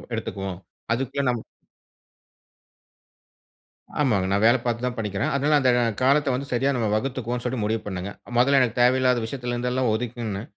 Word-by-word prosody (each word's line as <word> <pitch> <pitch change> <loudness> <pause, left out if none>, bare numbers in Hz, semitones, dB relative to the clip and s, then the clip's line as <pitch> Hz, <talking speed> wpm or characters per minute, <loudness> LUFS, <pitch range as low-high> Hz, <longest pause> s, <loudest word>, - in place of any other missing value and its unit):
எடுத்துக்குவோம். 95 -4 -5 0.3
அதுக்குள்ள 135 +3 -2
நம்ம 120 - -2 2.6
ஆமாங்க. 110 -10 +2
நான் 100 +2 +2
வேல 120 +3 +6
பார்த்து 120 +1 -1
தான் 125 -1 -3
படிக்கிறேன். 105 +7 -2
அதனால 150 +2 +2
அந்த 130 -2 +3 0.3
காலத்த 140 0 +3
வந்து 135 +2 -4
சரியா 135 +3 +2
நாம 115 -3 0
வகுத்துக்குவோம்ன்னு 125 0 -2
சொல்ட்டு 125 -3 -1
முடிவு 110 +1 0
பண்ணுங்க. 95 +1 -4 0.3
முதல்ல 135 +2 +5
எனக்கு 125 -1 0
தேவையில்லாத 125 -1 +3
விஷயத்துல 125 0 -4
இருந்து 125 +1 -1
எல்லாம் 125 -3 +1
ஒதுக்குனே 115 -3 -3
125 Hz, 150 wpm, -24 LUFS, 110-130 Hz, 2.6 s, வேல